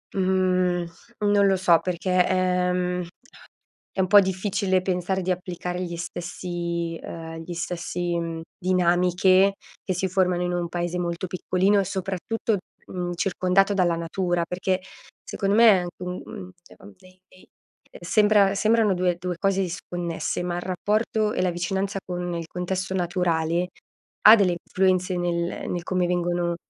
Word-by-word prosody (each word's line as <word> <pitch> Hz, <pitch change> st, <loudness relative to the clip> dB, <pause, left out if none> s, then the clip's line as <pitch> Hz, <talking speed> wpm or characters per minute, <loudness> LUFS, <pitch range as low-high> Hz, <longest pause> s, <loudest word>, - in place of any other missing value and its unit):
Mhmm, 185 Hz, -2 st, +1 dB, 0.4 s
non 205 Hz, -1 st, +4 dB
lo 195 Hz, -1 st, +3 dB
so, 175 Hz, -3 st, +4 dB
perché, 180 Hz, +1 st, +1 dB
ehm, 180 Hz, -1 st, 0 dB, 0.9 s
è -, -, -3 dB
un 190 Hz, -, +3 dB
po' 205 Hz, +1 st, +8 dB
difficile 190 Hz, 0 st, 0 dB
pensare 185 Hz, +1 st, -1 dB
di 185 Hz, -, -2 dB
applicare 180 Hz, 0 st, -3 dB
gli 170 Hz, -1 st, -4 dB
stessi 170 Hz, -1 st, -4 dB
uhm, 165 Hz, -1 st, -7 dB
gli 175 Hz, +1 st, -7 dB
stessi 175 Hz, 0 st, -3 dB
mhmm, 165 Hz, -1 st, -4 dB, 0.2 s
dinamiche 180 Hz, +1 st, +3 dB, 0.3 s
che 185 Hz, -, -2 dB
si 190 Hz, +2 st, -1 dB
formano 180 Hz, -1 st, +1 dB
in 180 Hz, 0 st, -1 dB
un 175 Hz, -1 st, -2 dB
paese 175 Hz, +1 st, -3 dB
molto 175 Hz, +1 st, -2 dB
piccolino 185 Hz, +2 st, +1 dB
e -, -, 0 dB
soprattutto, 195 Hz, +3 st, -2 dB, 0.3 s
mhmm, 175 Hz, -1 st, -4 dB
circondato 185 Hz, +2 st, +2 dB
dalla 180 Hz, -4 st, +2 dB
natura. 175 Hz, +1 st, -1 dB
Perché 185 Hz, +1 st, -1 dB, 0.4 s
secondo 195 Hz, 0 st, -1 dB
me 230 Hz, +1 st, +7 dB
è 200 Hz, -, +6 dB
anche, 180 Hz, 0 st, -6 dB
mhmm, 180 Hz, 0 st, -7 dB, 0.5 s
dei 185 Hz, 0 st, -20 dB
dei 185 Hz, -, -21 dB, 0.5 s
sembra 205 Hz, +2 st, +3 dB
sembrano 220 Hz, 0 st, +3 dB
due 180 Hz, -1 st, +1 dB
due 180 Hz, -1 st, -4 dB
cose 195 Hz, 0 st, +1 dB
disconnesse, 175 Hz, -2 st, -3 dB
ma 175 Hz, 0 st, -2 dB
il -, -, -2 dB
rapporto 210 Hz, +3 st, 0 dB
e -, -, -2 dB
la 185 Hz, 0 st, +2 dB
vicinanza 190 Hz, +3 st, -2 dB
con 175 Hz, -1 st, -4 dB
il 165 Hz, -1 st, -4 dB
contesto 180 Hz, +2 st, -3 dB
naturale 175 Hz, -1 st, 0 dB, 0.6 s
ha 220 Hz, -, +11 dB
delle 185 Hz, -4 st, +2 dB
influenze 185 Hz, -1 st, +1 dB
nel 170 Hz, -1 st, -2 dB
nel 175 Hz, -, -2 dB
come 180 Hz, -1 st, 0 dB
vengono, 175 Hz, -1 st, 0 dB
180 Hz, 145 wpm, -24 LUFS, 175-190 Hz, 0.9 s, ha